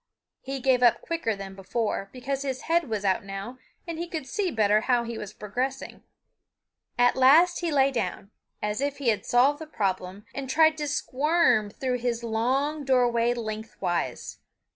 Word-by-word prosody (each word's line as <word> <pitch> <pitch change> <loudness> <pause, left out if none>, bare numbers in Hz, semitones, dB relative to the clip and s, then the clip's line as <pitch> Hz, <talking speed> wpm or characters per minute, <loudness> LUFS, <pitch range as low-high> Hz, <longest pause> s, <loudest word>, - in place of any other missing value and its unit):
He 270 0 -5
gave 255 -1 +2
up 240 -2 +4
quicker 330 -10 -1
than 195 -1 -8
before, 195 +1 -3
because 265 +2 -4
his 265 -2 -3
head 335 -3 +1
was 210 -2 -2
out 195 +3 +1
now 195 +6 -7 0.3
and 330 -1 -5
he 345 - -3
could 320 -5 -5
see 405 +5 -1
better 215 -5 +3
how 245 0 +2
he 235 0 -5
was 210 -2 -6
progressing. 250 +6 -4 1.0
At 245 0 +4
last 310 +7 +5
he 340 -2 -2
lay 275 -1 +3
down, 200 -4 -3 0.3
as 210 +4 -1
if 285 0 -1
he 270 -4 0
had 210 -3 -1
solved 270 +4 +3
the 315 - -8
problem, 190 -5 -3
and 275 -2 -5
tried 315 +2 +4
to 295 - -2
squirm 280 -5 +2
through 250 +3 -2
his 235 -1 -2
long 265 +7 0
doorway 245 -2 +2
lengthwise. 215 - -4
245 Hz, 170 wpm, -26 LUFS, 215-280 Hz, 1.0 s, last